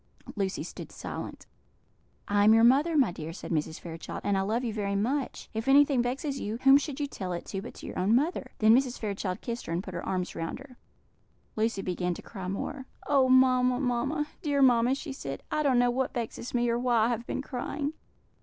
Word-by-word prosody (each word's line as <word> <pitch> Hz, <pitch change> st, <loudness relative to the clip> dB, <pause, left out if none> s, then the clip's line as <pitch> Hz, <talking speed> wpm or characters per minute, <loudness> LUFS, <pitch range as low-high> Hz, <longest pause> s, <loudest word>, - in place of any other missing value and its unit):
Lucy 195 Hz, -2 st, -2 dB
stood -, -, -8 dB
silent. -, -, -7 dB, 0.8 s
"I 205 Hz, 0 st, +3 dB
am 220 Hz, +1 st, +7 dB
your 225 Hz, -, +5 dB
mother, 290 Hz, +7 st, +4 dB
my 260 Hz, -10 st, +4 dB
dear," 160 Hz, -1 st, -6 dB
said 185 Hz, -, -8 dB
Mrs. 160 Hz, 0 st, -1 dB
Fairchild, 165 Hz, -1 st, -7 dB
"and 205 Hz, -, +1 dB
I 195 Hz, -, +2 dB
love 220 Hz, +6 st, -1 dB
you 230 Hz, -3 st, -2 dB
very 200 Hz, -2 st, -2 dB
much; 255 Hz, +7 st, -1 dB
if 220 Hz, +2 st, -3 dB
anything 275 Hz, -1 st, +5 dB
vexes 270 Hz, +3 st, -2 dB
you, 215 Hz, +2 st, -3 dB
whom 270 Hz, +1 st, +8 dB
should 290 Hz, -1 st, -5 dB
you 290 Hz, -, 0 dB
tell 185 Hz, -9 st, -5 dB
it 175 Hz, -, -5 dB
to 195 Hz, -, -4 dB
but -, -, -9 dB
to -, -, -10 dB
your -, -, -5 dB
own 200 Hz, +5 st, +3 dB
mother?" 275 Hz, -1 st, 0 dB
Then 220 Hz, +1 st, +6 dB
Mrs. 260 Hz, -1 st, +1 dB
Fairchild 200 Hz, -3 st, -3 dB
kissed 235 Hz, 0 st, -5 dB
her, -, -, -4 dB
and 175 Hz, +3 st, -1 dB
put 185 Hz, -, -8 dB
her 170 Hz, -, -4 dB
arms 185 Hz, -1 st, -2 dB
round 165 Hz, 0 st, -4 dB
her. 270 Hz, -2 st, -13 dB, 0.8 s
Lucy 215 Hz, -2 st, 0 dB
began 180 Hz, -1 st, -1 dB
to -, -, -10 dB
cry 190 Hz, -4 st, -7 dB
more. 260 Hz, +8 st, -4 dB, 0.2 s
"Oh, 270 Hz, -2 st, +3 dB
mamma, 255 Hz, -1 st, +4 dB
mamma! 275 Hz, +4 st, 0 dB, 0.2 s
dear 285 Hz, -5 st, +2 dB
mamma!" 245 Hz, 0 st, +4 dB
she 280 Hz, 0 st, -6 dB
said, 135 Hz, -, -6 dB
"I 305 Hz, -, +1 dB
don't 275 Hz, -4 st, +3 dB
know 245 Hz, 0 st, +4 dB
what 260 Hz, +1 st, -1 dB
vexes 235 Hz, +1 st, -4 dB
me, 240 Hz, 0 st, +2 dB
or 235 Hz, 0 st, +1 dB
why 240 Hz, -3 st, +3 dB
I -, -, +1 dB
have 235 Hz, 0 st, -3 dB
been 265 Hz, -, -3 dB
crying." 285 Hz, +3 st, -3 dB
240 Hz, 220 wpm, -28 LUFS, 200-270 Hz, 0.8 s, whom